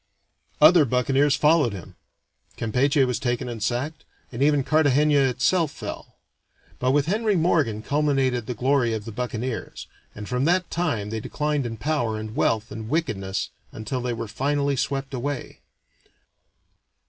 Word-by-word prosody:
Other 155 Hz, +2 st, +7 dB
buccaneers 135 Hz, +3 st, +2 dB
followed 150 Hz, -5 st, +3 dB
him. 95 Hz, -4 st, -10 dB, 0.6 s
Campeche 135 Hz, +5 st, +2 dB
was 125 Hz, -3 st, -1 dB
taken 125 Hz, -1 st, -2 dB
and 115 Hz, -3 st, -6 dB
sacked, 130 Hz, +8 st, -2 dB, 0.3 s
and 120 Hz, +1 st, -6 dB
even 145 Hz, -1 st, +3 dB
Cartagena 150 Hz, 0 st, +3 dB
itself 155 Hz, +6 st, +1 dB
fell; 145 Hz, -, -8 dB, 0.6 s
but 125 Hz, -, +1 dB
with 145 Hz, +1 st, +3 dB
Henry 210 Hz, +4 st, +1 dB
Morgan 155 Hz, -, +1 dB
culminated 135 Hz, -5 st, 0 dB
the 125 Hz, -, -3 dB
glory 125 Hz, -1 st, +1 dB
of 105 Hz, -1 st, -6 dB
the 115 Hz, -, -6 dB
buccaneers, 120 Hz, +1 st, -4 dB, 0.3 s
and 105 Hz, 0 st, -7 dB
from 125 Hz, +2 st, 0 dB
that 175 Hz, +2 st, +1 dB
time 120 Hz, -12 st, -1 dB
they 110 Hz, -, -2 dB
declined 150 Hz, +2 st, -2 dB
in 115 Hz, -1 st, -6 dB
power 120 Hz, -4 st, -1 dB
and 110 Hz, +1 st, -7 dB
wealth 115 Hz, 0 st, 0 dB
and 110 Hz, 0 st, -7 dB
wickedness 105 Hz, -, -2 dB, 0.2 s
until 110 Hz, +4 st, -4 dB
they 125 Hz, 0 st, -2 dB
were 115 Hz, -1 st, -4 dB
finally 140 Hz, +4 st, 0 dB
swept 135 Hz, +1 st, -2 dB
away. 135 Hz, +1 st, -4 dB
130 Hz, 150 wpm, -24 LUFS, 115-150 Hz, 0.6 s, Other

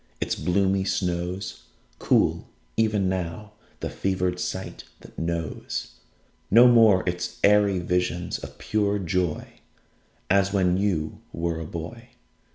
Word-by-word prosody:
Its -, -, -1 dB
bloomy 95 Hz, +1 st, +1 dB
snows 90 Hz, -1 st, -2 dB, 0.3 s
Cool -, -, +2 dB, 0.3 s
even 105 Hz, -3 st, +2 dB
now 95 Hz, +3 st, -3 dB, 0.3 s
the -, -, -2 dB
fevered 90 Hz, -2 st, -1 dB
sight -, -, -4 dB, 0.2 s
that -, -, -15 dB
knows 85 Hz, -1 st, -3 dB, 0.6 s
No 120 Hz, +4 st, +8 dB
more 110 Hz, -6 st, +5 dB
its 90 Hz, 0 st, -3 dB
airy 100 Hz, -1 st, +5 dB
visions 90 Hz, 0 st, -1 dB
of -, -, -10 dB
pure 105 Hz, -2 st, 0 dB
joy 90 Hz, -3 st, -2 dB, 0.7 s
As 100 Hz, +1 st, +3 dB
when 90 Hz, -3 st, +2 dB
you 90 Hz, -6 st, -1 dB
were 85 Hz, -1 st, -2 dB
a 80 Hz, -, -6 dB
boy. 100 Hz, +10 st, -7 dB
95 Hz, 120 wpm, -25 LUFS, 90-100 Hz, 0.7 s, No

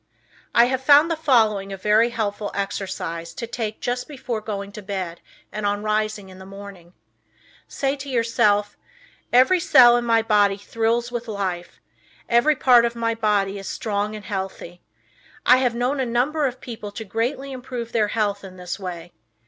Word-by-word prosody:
I 235 Hz, -, +7 dB
have 260 Hz, +1 st, -1 dB
found 290 Hz, +4 st, +6 dB
the -, -, +1 dB
following 220 Hz, -10 st, +2 dB
a 195 Hz, -, -5 dB
very 215 Hz, +4 st, +3 dB
helpful 210 Hz, -3 st, -3 dB
exercise 170 Hz, -4 st, -4 dB
to -, -, -4 dB
take 225 Hz, -2 st, -5 dB
just 245 Hz, 0 st, -2 dB
before 260 Hz, -6 st, -5 dB
going 200 Hz, -2 st, -5 dB
to 210 Hz, -, -9 dB
bed 190 Hz, -4 st, -5 dB, 0.3 s
and 215 Hz, +1 st, -5 dB
on 205 Hz, 0 st, -1 dB
rising 215 Hz, -2 st, -1 dB
in 185 Hz, 0 st, -13 dB
the -, -, -10 dB
morning: 195 Hz, -3 st, -11 dB, 0.7 s
Say 275 Hz, 0 st, -1 dB
to 275 Hz, +1 st, -8 dB
yourself, 210 Hz, -4 st, +1 dB, 0.6 s
"Every 260 Hz, +10 st, +5 dB
cell 255 Hz, -9 st, +7 dB
in 240 Hz, -, -1 dB
my 230 Hz, -1 st, +2 dB
body 205 Hz, -3 st, +3 dB
thrills 230 Hz, +3 st, -1 dB
with 240 Hz, -1 st, -4 dB
life; 190 Hz, -5 st, -4 dB, 0.5 s
every 240 Hz, +6 st, +3 dB
part 250 Hz, -3 st, +5 dB
of 235 Hz, 0 st, -1 dB
my 230 Hz, 0 st, 0 dB
body 205 Hz, -3 st, 0 dB
is 195 Hz, -, -8 dB
strong 210 Hz, -1 st, -2 dB
and 210 Hz, -, -9 dB
healthy." 190 Hz, -3 st, -6 dB, 0.6 s
I 255 Hz, -, +7 dB
have 250 Hz, -2 st, +1 dB
known 250 Hz, +4 st, -1 dB
a 260 Hz, -, +1 dB
number 275 Hz, +6 st, +1 dB
of 255 Hz, 0 st, -7 dB
people 220 Hz, -4 st, -7 dB
to 225 Hz, -, -7 dB
greatly 250 Hz, +6 st, -2 dB
improve 250 Hz, -2 st, -6 dB
their 220 Hz, -2 st, +2 dB
health 205 Hz, -2 st, -1 dB
in 185 Hz, -1 st, -11 dB
this 180 Hz, +1 st, -6 dB
way. 175 Hz, -2 st, -7 dB
220 Hz, 175 wpm, -22 LUFS, 200-245 Hz, 0.7 s, I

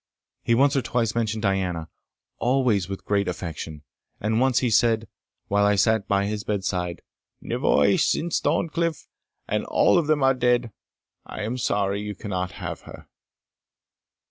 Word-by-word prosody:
He 115 Hz, -, +2 dB
once 140 Hz, +3 st, +3 dB
or 135 Hz, -, +2 dB
twice 115 Hz, -1 st, -1 dB
mentioned 110 Hz, -2 st, -1 dB
Diana, 90 Hz, -5 st, -1 dB, 0.5 s
always 120 Hz, -7 st, +1 dB
with 95 Hz, -, -6 dB
great 100 Hz, -1 st, +1 dB
affection; 80 Hz, -4 st, -5 dB, 0.4 s
and 110 Hz, +3 st, 0 dB
once 130 Hz, -1 st, +2 dB
he 125 Hz, -2 st, +2 dB
said, 115 Hz, 0 st, +3 dB, 0.4 s
while 100 Hz, 0 st, +2 dB
I 105 Hz, 0 st, +4 dB
sate 110 Hz, +2 st, +2 dB
by 100 Hz, 0 st, +2 dB
his 105 Hz, 0 st, -3 dB
bedside 95 Hz, -4 st, -2 dB, 0.4 s
"Nevoy, -, -, +2 dB
since 170 Hz, +1 st, +1 dB
Thorncliff 165 Hz, +1 st, -1 dB, 0.4 s
and -, -, -1 dB
all -, -, +4 dB
of 160 Hz, -, -2 dB
them 155 Hz, -3 st, +2 dB
are 135 Hz, 0 st, +5 dB
dead, 125 Hz, -2 st, +1 dB, 0.6 s
I 110 Hz, -, -6 dB
am 120 Hz, +4 st, -3 dB
sorry 100 Hz, -2 st, 0 dB
you 105 Hz, 0 st, -5 dB
cannot 90 Hz, -2 st, -4 dB
have -, -, -6 dB
her." -, -, -11 dB
105 Hz, 150 wpm, -24 LUFS, 100-125 Hz, 0.6 s, are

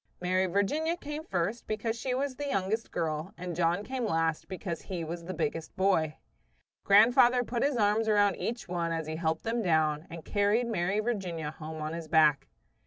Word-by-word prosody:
Mary 185 Hz, +1 st, +1 dB
Virginia 295 Hz, -, 0 dB
came 295 Hz, -1 st, -6 dB
first 195 Hz, -, -2 dB
because 225 Hz, +1 st, -2 dB
she 250 Hz, +2 st, -2 dB
was 270 Hz, 0 st, -2 dB
the 290 Hz, +2 st, -4 dB
youngest 210 Hz, -1 st, -1 dB
girl, 165 Hz, +4 st, -3 dB
and 180 Hz, -2 st, -5 dB
John 175 Hz, +3 st, +1 dB
came 255 Hz, +2 st, -3 dB
last 165 Hz, -6 st, 0 dB
because 185 Hz, -3 st, -5 dB
he 180 Hz, -3 st, -5 dB
was 170 Hz, +1 st, -5 dB
the 185 Hz, -, -4 dB
biggest 155 Hz, 0 st, -3 dB
boy. 185 Hz, -6 st, +1 dB, 0.7 s
Grandfather 240 Hz, +4 st, +6 dB
put 240 Hz, 0 st, -3 dB
his 280 Hz, -2 st, +1 dB
arms 215 Hz, +1 st, +2 dB
around 205 Hz, -2 st, +4 dB
each 235 Hz, -2 st, -4 dB
one 170 Hz, -2 st, -2 dB
as 165 Hz, -1 st, -2 dB
he 155 Hz, +1 st, -4 dB
helped 160 Hz, -1 st, -1 dB
them 230 Hz, +1 st, -1 dB
down, 155 Hz, -3 st, +1 dB
and 165 Hz, -2 st, -9 dB
carried 205 Hz, +4 st, +2 dB
Mary 200 Hz, -3 st, 0 dB
Virginia 180 Hz, -9 st, -3 dB
home 155 Hz, 0 st, -7 dB
on 155 Hz, +1 st, -3 dB
his 165 Hz, -1 st, -6 dB
back. 155 Hz, -2 st, +4 dB
190 Hz, 185 wpm, -30 LUFS, 165-225 Hz, 0.7 s, Grandfather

